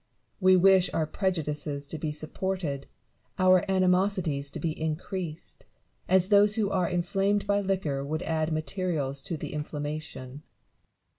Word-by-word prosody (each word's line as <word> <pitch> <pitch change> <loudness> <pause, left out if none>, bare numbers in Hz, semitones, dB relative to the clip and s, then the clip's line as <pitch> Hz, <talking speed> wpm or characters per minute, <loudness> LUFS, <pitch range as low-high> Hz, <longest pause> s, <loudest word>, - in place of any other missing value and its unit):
We 185 -1 +6
wish 190 0 +5
our 160 - +1
prejudices 150 -5 -2
to 155 +2 -7
be 155 0 -2
supported, 155 -1 -3 0.5
our 185 -1 +5
animosities 185 -6 +2
to - - -7
be 165 - -1
increased; 160 +2 -5 0.5
as 185 0 +4
those 205 0 +5
who 210 -3 0
are 185 -3 +1
inflamed 195 +3 0
by 205 0 +2
liquor 185 -8 -1
would 155 +4 -3
add 160 0 -1
materials 155 -4 -2
to 155 +4 -4
the - - -6
inflam 150 0 -4
mation. 155 +1 -5
Newton. 130 +4 -11
170 Hz, 145 wpm, -28 LUFS, 150-190 Hz, 0.5 s, We